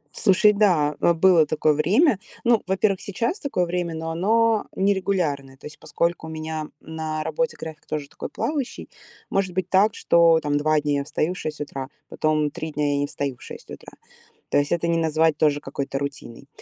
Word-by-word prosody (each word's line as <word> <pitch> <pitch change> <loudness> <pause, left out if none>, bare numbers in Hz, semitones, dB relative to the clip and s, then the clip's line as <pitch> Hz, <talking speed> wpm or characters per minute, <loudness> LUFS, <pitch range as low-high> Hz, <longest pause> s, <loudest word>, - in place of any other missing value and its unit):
Слушай, 205 +2 +4
да, 175 -8 +2
э, 170 - +4
было 170 -2 +5
такое 155 0 +2
время. 195 - +3 0.2
Ну, 235 -2 +3
во-первых, 190 0 +1
сейчас 235 - -2
такое 270 - -1
время, 175 -1 -2
но 160 0 -4
оно 220 +5 +2
не 200 +1 +3
регулярное. 150 -9 -2
То - - -16
есть, 150 - -10
поскольку 170 +1 -2
у - - -7
меня 155 -1 -5
на 160 -1 -4
работе - - -2
график 160 -1 -9
тоже 150 -2 -4
такой - - -8
плавающий, 285 -5 -3 0.4
может 190 -2 0
быть 185 -1 -1
так, 200 +3 +4
что 170 -1 +4
там 145 -2 0
2 155 +1 +2
дня 145 -1 0
я 140 - -2
встаю 155 +4 -1
в 185 - -9
6 150 -1 -5
утра, 135 -2 -5 0.2
потом 155 -1 0
3 160 +2 -6
дня 150 -1 0
я 140 - 0
не 145 - 0
встаю 140 -3 -4
в - - -26
6 - - -11
утра. - - -11 0.6
То - - +3
есть 145 - -1
это 170 -1 0
не 165 0 +1
назвать 160 -1 +2
тоже 150 -2 +2
какой-то 140 -1 -4
рутиной. 140 -2 -6
160 Hz, 200 wpm, -23 LUFS, 150-190 Hz, 0.6 s, было